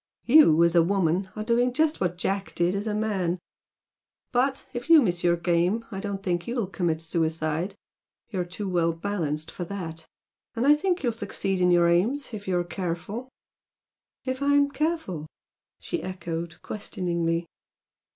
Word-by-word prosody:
You, 235 - +7
as 170 -1 +3
a 170 - +6
woman, 185 +1 +1
are 215 - -3
doing 240 +2 +2
just 310 +3 +1
what 180 -1 0
Jack 195 +2 -2
did 175 +1 +2
as 200 +2 -2
a 210 - -1
man. 195 -5 0 0.9
But, 265 +1 +1
if 245 +4 -5
you 330 -1 +9
miss 175 -10 0
your 175 0 +4
game, 175 +6 +1
I 195 - -4
don't 195 -1 -4
think 175 -3 -1
you'll 235 -2 -1
commit 175 -4 -1
suicide. 160 +2 -1 0.6
You're 185 -4 -1
too 185 +3 -5
well 170 -2 +1
balanced 165 -4 -3
for 180 - -5
that. 165 -4 -6 0.5
And 235 +2 0
I 290 - +8
think 355 +3 0
you'll 240 - +2
succeed 195 -3 -2
in 180 - +4
your 175 -1 +5
aims 220 +12 +1
if 205 -2 -7
you're 180 -2 +1
careful!" 185 +7 -4 1.0
"If 260 +1 -2
I'm 285 0 +3
careful?" 295 - -2 0.5
she 345 - -3
echoed, 170 -2 -5
questioningly. 170 -4 -2
190 Hz, 160 wpm, -26 LUFS, 170-230 Hz, 1.0 s, you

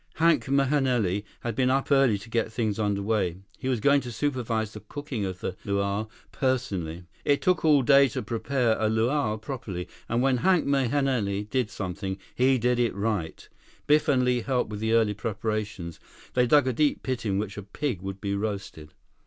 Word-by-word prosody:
Hank 160 -7 +3
Mahenili 130 -8 +1 0.2
had 120 - -2
been 130 +1 +2
up 135 +2 0
early 135 -6 +4
to 105 +4 -12
get 115 -1 0
things 110 -2 -1
under 100 -2 0
way. 100 -5 0 0.2
He 130 - -4
was 125 -3 +1
going 140 +5 +4
to 125 - -7
supervise 115 -5 -1
the 105 - -7
cooking 120 0 -5
of 95 -1 -5
the 95 - -3
luau 100 +1 -1 0.2
personally. 95 - -2 0.2
It 140 -1 +3
took 180 -2 +1
all 150 -4 +5
day 140 +1 +6
to 115 - -4
prepare 115 +1 0
a 110 - +2
luau 110 +1 +1
properly, 110 -6 -6 0.2
and 120 +2 +1
when 135 -1 +3
Hank 180 +5 +3
Mahenili 130 -7 +1
did 130 -4 0
something, 95 0 -4 0.2
he 130 +1 +3
did 125 +1 +1
it 120 -2 +1
right. 100 -6 -2 0.4
Biff 150 +1 +3
and 130 -3 +3
Li 125 -1 +2
helped 125 -2 -1
with 105 - -5
the 110 +1 0
early 110 -2 +3
preparations. 105 -4 -4 0.3
They 125 -1 +3
dug 145 +1 +5
a 130 - +1
deep 145 +4 +1
pit 130 -2 -2
in 100 -3 0
which 100 -1 -3
a 105 - -5
pig 105 +1 -3
would 95 0 -6
be 100 -1 -2
roasted. 100 -7 -4
115 Hz, 190 wpm, -27 LUFS, 100-130 Hz, 0.4 s, day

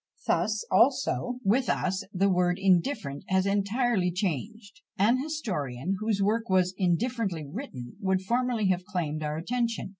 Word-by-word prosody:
Thus 215 -1 0
also 250 +2 +2
with 240 +6 +2
us 185 +1 0
the 195 0 +2
word 180 -2 +2
indifferent 185 - +1
has 190 0 +2
entirely 200 -1 +1
changed: 200 - -4 0.2
an 235 +6 +3
historian, 190 - -3
whose 215 -2 0
work 225 +2 0
was 185 -1 +3
indifferently 190 -2 0
written, 140 - -8
would 190 -2 0
formerly 235 -1 +1
have 185 -1 +1
claimed 170 -6 -3
our 150 0 -2
attention. 230 +5 -2
195 Hz, 140 wpm, -28 LUFS, 180-230 Hz, 0.2 s, an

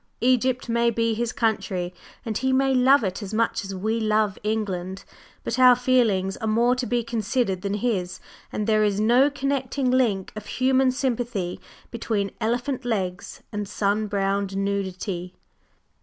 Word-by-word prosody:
Egypt 255 +1 +2
may 235 0 +2
be 230 0 0
his 235 +1 -2
country, 190 -5 -1 0.3
and 220 -2 -3
he 260 +4 0
may 270 +1 +3
love 260 +1 +5
it 190 +1 -2
as 205 +1 -5
much 230 0 0
as 195 0 -6
we 220 +4 -1
love 215 -2 +1
England; 195 -3 -2 0.4
but 235 - -2
our 250 -1 +8
feelings 230 -7 +2
are 220 - -4
more 235 +3 +3
to 250 -1 -3
be 240 +1 0
considered 225 -3 -1
than 200 +1 -2
his, 200 -5 -2 0.3
and 210 - -2
there 215 0 +3
is 205 -1 +1
no 240 +6 +4
connecting 275 -2 -1
link 225 -7 +1
of 215 -1 -8
human 260 0 +2
sympathy 240 -8 -2 0.3
between 215 -4 -2
Elephant 245 +4 -1
Legs 195 -6 -3
and 205 -1 -4
sun 210 +1 0
browned 200 -1 -1
Nudity! 190 -2 -3
220 Hz, 155 wpm, -24 LUFS, 200-250 Hz, 0.4 s, our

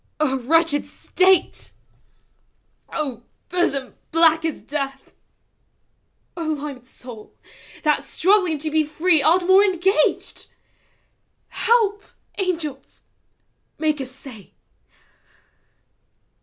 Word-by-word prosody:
() - - -48 0.3
wretched 325 -2 +3
state! 375 0 +1 0.6
() - - -44
hosom 275 +3 -3 0.2
black 325 0 +4
as 320 -2 -3
death! 275 -2 -5 1.2
O 345 - -6
limed 290 -5 -4
soul, 240 -4 -12 0.5
that, 300 -2 +2
struggling 365 -3 +2
to 310 +1 -4
be 315 0 +3
free. 315 +2 +2
Art 350 +5 +3
more 380 +2 +6
engaged! 380 -4 0 1.0
Help, 440 -3 +2 0.4
angels! 325 -8 -4 0.7
Make 305 -2 0
assay! 255 -5 -10
315 Hz, 85 wpm, -22 LUFS, 275-360 Hz, 1.2 s, more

